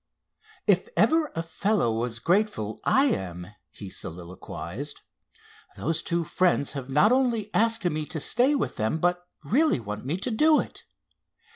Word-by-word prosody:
"If - - +2
ever 320 -2 +3
a 165 - -1
fellow 165 - 0
was 115 +1 -2
grateful 165 - 0
I 270 +2 +4
am!" 90 - -2 0.2
he 100 -2 -10
soliloquized. 90 - -6 0.8
"Those 165 +1 -1
two 170 0 -1
friends 170 -4 +1
have 135 -2 -6
not 150 - +4
only 240 -5 +1
asked 225 -2 +2
me 155 -3 -1
to 160 - -4
stay 250 - +3
with 275 - -2
them, 110 +8 0
but 175 +2 0 0.2
really 305 - +2
want 105 -1 -6
me 145 +7 -2
to 235 +6 -3
do 305 +7 +4
it. - - -6
165 Hz, 150 wpm, -26 LUFS, -, 0.8 s, I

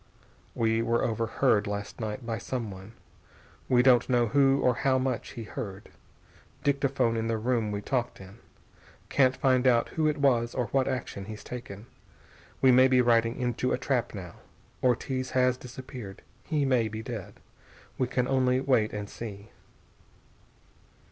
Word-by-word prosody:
We 115 0 +1
were 115 +1 +1
overheard 110 -2 +1
last 100 +2 -5
night 110 +2 -4
by 115 0 -3
someone. 110 -5 -6 0.8
We 125 -1 +4
don't 125 -1 +4
know 120 -2 +3
who 135 +2 +4
or 125 - +4
how 130 -1 +2
much 130 -2 -2
he 115 - -6
heard. 100 -2 -7 0.7
Dictaphone 135 -4 +1
in 115 0 -1
the 115 -1 0
room 115 -1 0
we 100 0 -3
talked 125 -3 -2
in. 95 +3 -13 0.7
Can't 130 -2 +3
find 130 -1 +3
out 120 -2 +3
who 155 -1 0
it 150 0 0
was 120 -5 +2
or 125 - 0
what 135 -1 +1
action 125 -6 -4
he's 110 0 -8
taken. 110 -4 -8 0.8
We 130 - +7
may 130 +1 +6
be 130 -1 +3
riding 115 0 +3
into 125 0 -1
a - - +1
trap 125 -3 -1
now. 90 -3 -8 0.4
Ortiz 130 +1 0
has 125 0 +3
disappeared. 125 -5 -9 0.2
He 150 -3 0
may 125 -4 +2
be 110 +1 -6
dead. 110 -5 -7 0.6
We 130 - +1
can 125 0 0
only 130 -1 +2
wait 130 -5 +1
and 105 -1 -4
see. 105 -1 -9
120 Hz, 155 wpm, -28 LUFS, 110-130 Hz, 0.8 s, We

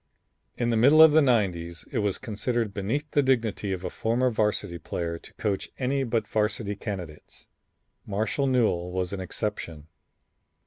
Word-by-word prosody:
In 120 -1 0
the 115 - +2
middle 140 +7 +6
'90's 115 - +4
it - - -1
was 105 -3 0
considered 115 -1 -2
beneath 135 +11 -2
the 145 - +3
dignity 115 -6 0
of 95 -1 -3
a - - -3
former 125 +3 +1
Varsity 105 -5 -1
player 85 +1 -4
to - - -13
coach 100 -3 -2
any 135 +1 0
but 115 -3 -1
Varsity 105 -1 -1
candidates. 90 -7 -7 0.6
Marshall 110 +8 0
Newell 110 -9 +1
was 90 0 -2
an 100 - -3
exception. 90 -5 -4
105 Hz, 145 wpm, -26 LUFS, 95-125 Hz, 0.6 s, middle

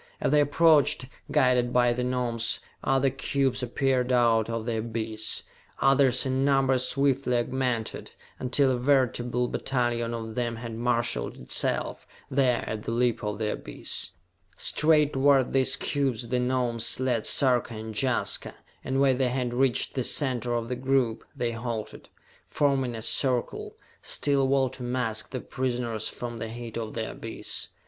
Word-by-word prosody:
As - - 0
they 150 - +5
approached, 145 -2 +3 0.3
guided 125 -2 +3
by 120 -1 +3
the 125 +1 -2
Gnomes, 120 -2 0 0.2
other 135 0 +2
cubes 135 0 -1
appeared 125 +1 0
out 115 -3 +3
of 115 -1 -3
the 115 -2 -1
abyss, 110 -1 -3 0.4
others 135 -1 +4
in 130 0 0
numbers 135 -2 +2
swiftly 135 -2 +1
augmented, 120 -2 -2 0.3
until 130 +1 +2
a 125 - 0
veritable 125 -2 +1
battalion 120 -2 -1
of 110 -1 -6
them 120 0 -2
had 115 0 -7
marshalled 115 - -1
itself, 60 - -2 0.2
there 130 -3 +2
at 110 -1 -4
the 115 - -4
lip 120 -1 0
of 105 -1 -3
the 105 -1 -1
abyss. - - -6 0.5
Straight 150 -1 +3
toward 135 -1 +3
these 135 -1 +3
cubes 130 -5 -2
the 125 - +1
Gnomes 125 -2 0
led 125 -4 0
Sarka 125 -4 +4
and 110 0 -7
Jaska, 130 +2 0 0.3
and 135 +1 -1
when 135 -2 +3
they 130 -2 +2
had 125 -1 -2
reached 130 0 +1
the 130 - -1
center 125 -3 0
of 115 -1 -2
the 125 - -2
group, 130 -3 0
they 120 -3 -1
halted, 115 -1 -6 0.4
forming 135 -4 0
a 110 - -4
circle, 140 - +1 0.3
still 140 -1 +1
a - - +2
wall 135 -1 +2
to 130 - -10
mask 120 -3 -1
the 130 - -4
prisoners 120 -4 -2
from 120 -1 -6
the 115 0 -5
heat 115 0 -8
of 115 -2 -5
the 110 -1 -3
abyss. 115 - -4
125 Hz, 155 wpm, -27 LUFS, 115-135 Hz, 0.5 s, they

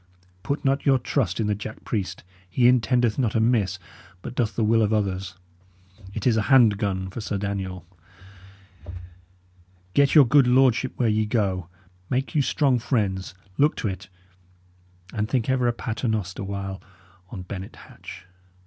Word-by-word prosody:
Put 140 +6 -3
not 135 +1 +1
your 135 -1 +4
trust 120 -6 -1
in 110 - +1
the 105 - +1
jack 105 +2 -7
priest; 95 -5 -3 0.3
he 120 +6 +3
intendeth 120 -1 +2
not 115 -5 0
amiss, 110 -4 +2 0.5
but - - -6
doth 120 -3 -1
the 115 - 0
will 115 +1 +3
of 105 -1 +1
others; 95 -3 -1 0.8
it 110 - -4
is 115 -3 +3
a - - +3
hand 115 -7 +5
gun 95 -2 -2
for 115 - -6
Sir 100 -1 -3
Daniel! 95 -3 -4 2.1
Get 140 -1 +3
your 150 -3 +9
good 135 +1 +5
lordship 130 0 +3
where 120 - +1
ye 110 0 +1
go; 95 -6 -1 0.4
make 130 +2 -1
you 150 - +3
strong 135 -2 +2
friends; 95 -7 -1 0.2
look 145 +2 +4
to - - -3
it. 95 -1 -6 1.0
And 105 0 -2
think 130 -1 0
ever 125 -2 +1
a - - +3
pater 115 +1 -4
noster 100 -4 -2
while 95 0 -5 0.5
on 90 - -7
Bennet 95 +1 -7
Hatch. - - -12
110 Hz, 160 wpm, -24 LUFS, 100-125 Hz, 2.1 s, your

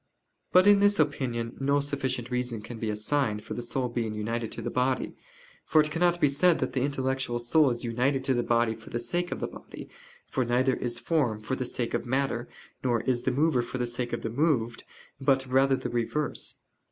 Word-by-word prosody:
But 185 +1 +6
in 205 -1 +7
this 205 0 +4
opinion 130 -6 0
no 140 +1 +2
sufficient 130 -4 -2
reason 125 -3 -2
can 115 +1 -8
be 110 - -2
assigned 105 0 0
for - - -6
the - - -4
soul 125 +2 -2
being 115 -3 -3
united 115 +1 -3
to - - -5
the - - -3
body. 125 0 0 0.5
For 155 - +3
it 150 0 +3
cannot 175 +2 +2
be 150 - +5
said 160 +5 +3
that 130 - -2
the 130 - 0
intellectual 130 -2 -1
soul 135 +5 +3
is 120 0 -2
united 125 +3 0
to 135 - +2
the 120 - +1
body 115 -1 +2
for 110 -1 -13
the - - -2
sake 175 +9 -2
of - - -3
the - - -2
body: - - -11 0.4
for 130 - -1
neither 125 +2 +2
is 120 -1 -3
form 125 -6 0
for 110 +5 -3
the 130 - -3
sake 120 -1 -3
of - - -2
matter, 130 -2 -1 0.3
nor 120 -3 +1
is 125 -1 0
the 130 - 0
mover 145 0 +2
for 120 +2 -5
the 125 - 0
sake 120 0 -3
of 120 - -3
the 115 - -2
moved, 120 -4 0 0.3
but 135 -1 +2
rather 135 +1 +3
the - - -4
reverse. 120 +5 -2
125 Hz, 215 wpm, -28 LUFS, 120-140 Hz, 0.5 s, in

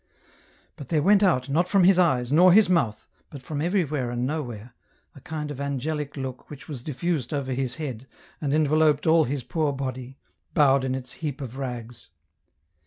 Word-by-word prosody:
But 140 - -10
there 155 -3 +1
went 200 +1 +5
out, 150 -10 +2
not 165 +6 +1
from 195 -1 +3
his 185 0 +5
eyes, 130 -8 +2
nor 180 +5 +6
his 210 +3 +6
mouth, 140 -13 0 0.2
but 140 -3 -10
from 145 +2 -4
everywhere 155 -7 0
and 120 +1 -2
nowhere, 125 -6 -5 0.4
a 140 - -15
kind 150 0 -5
of 140 -1 -6
angelic 140 +1 -3
look 130 -2 -6
which 145 -2 -11
was 140 -6 -7
diffused 150 0 -2
over 135 -2 -2
his 130 -1 -2
head, 130 -6 -6 0.3
and 145 -3 -1
enveloped 155 0 +3
all 160 -1 +5
his 135 0 -3
poor 150 +4 -1
body, 130 -1 -5 0.4
bowed 140 -2 +4
in 130 0 -1
its 130 -1 -7
heap 150 -4 -5
of 130 -3 -7
rags. 120 -3 -7
140 Hz, 180 wpm, -25 LUFS, 130-160 Hz, 0.4 s, nor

